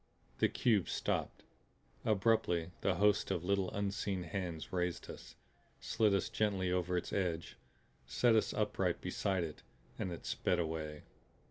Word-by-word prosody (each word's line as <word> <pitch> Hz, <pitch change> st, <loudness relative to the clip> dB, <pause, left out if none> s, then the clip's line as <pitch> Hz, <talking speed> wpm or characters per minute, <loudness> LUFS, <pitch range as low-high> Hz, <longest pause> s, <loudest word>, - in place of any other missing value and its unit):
The -, -, +4 dB
cube 110 Hz, -7 st, +2 dB
stopped, -, -, -1 dB, 0.6 s
abruptly; 95 Hz, -5 st, +2 dB
the -, -, +2 dB
hosts 105 Hz, 0 st, +3 dB
of 85 Hz, -, -1 dB
little 100 Hz, 0 st, +1 dB
unseen 100 Hz, -2 st, -2 dB
hands 85 Hz, -2 st, -4 dB
raised 90 Hz, -1 st, -1 dB
us, -, -, -11 dB, 0.4 s
slid 105 Hz, -3 st, +2 dB
us 95 Hz, -, +1 dB
gently 95 Hz, -4 st, 0 dB
over 90 Hz, 0 st, +1 dB
its -, -, -3 dB
edge, 85 Hz, -4 st, -1 dB, 0.5 s
set 115 Hz, -, +3 dB
us 110 Hz, -, +3 dB
upright -, -, 0 dB
beside 95 Hz, -2 st, -1 dB
it. 80 Hz, -2 st, -6 dB, 0.4 s
And 90 Hz, -, -2 dB
it 85 Hz, -, -7 dB
sped 90 Hz, -, +1 dB
away. 80 Hz, -2 st, -3 dB
90 Hz, 140 wpm, -35 LUFS, 85-100 Hz, 0.6 s, The